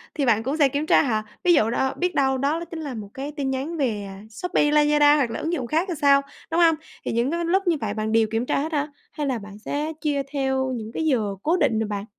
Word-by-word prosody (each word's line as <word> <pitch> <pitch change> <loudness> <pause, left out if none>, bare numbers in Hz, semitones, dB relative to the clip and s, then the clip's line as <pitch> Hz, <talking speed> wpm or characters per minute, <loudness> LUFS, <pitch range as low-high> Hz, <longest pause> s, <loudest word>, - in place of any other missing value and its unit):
thì 285 - 0
bạn 225 -3 +3
cũng 275 +6 -2
sẽ 285 -3 +4
kiểm 285 +3 -2
tra - - +5
hả? 220 -5 0 0.2
Ví 355 -1 +5
dụ 225 -8 +3
đó 265 +3 0
biết 360 0 -1
đâu 265 -1 +2
đó 285 +5 0
l - - -5
chính 330 - -5
là 285 -4 -5
một 215 -3 -7
cái 280 +2 -5
tin 275 -2 -1
nhắn 275 +6 -3
về, 225 -8 -1
à, 195 0 -10
Shopee, 295 +4 0
Lazada 295 0 +5
hoặc 265 -5 +1
là - - -4
ứng 330 +2 -2
dụng 255 -7 -2
khác 325 +6 +1
thì - - -1
sao, 280 -1 +5 0.3
đúng 330 - +1
hông? 330 -1 +5 0.3
Thì - - -1
những 235 +5 0
cái 340 0 -1
lúc 380 +2 +1
như 330 -3 +3
vậy 205 -2 -2
bạn 215 0 -2
đều 225 -1 +3
kiểm 225 +2 0
tra - - 0
hết 315 +3 -3
hả? 290 0 0 0.2
Hay 295 -2 -3
là 255 -3 -1
bạn 205 0 -11
sẽ 300 +2 -2
chia 290 -3 0
theo 265 -1 0
những 220 -1 -6
cái 320 - -2
giờ 220 -9 +1
cố 335 +4 +2
định 255 -10 +2
rồi 220 - -1
bạn? 205 -1 -4
275 Hz, 285 wpm, -24 LUFS, 225-305 Hz, 0.3 s, tra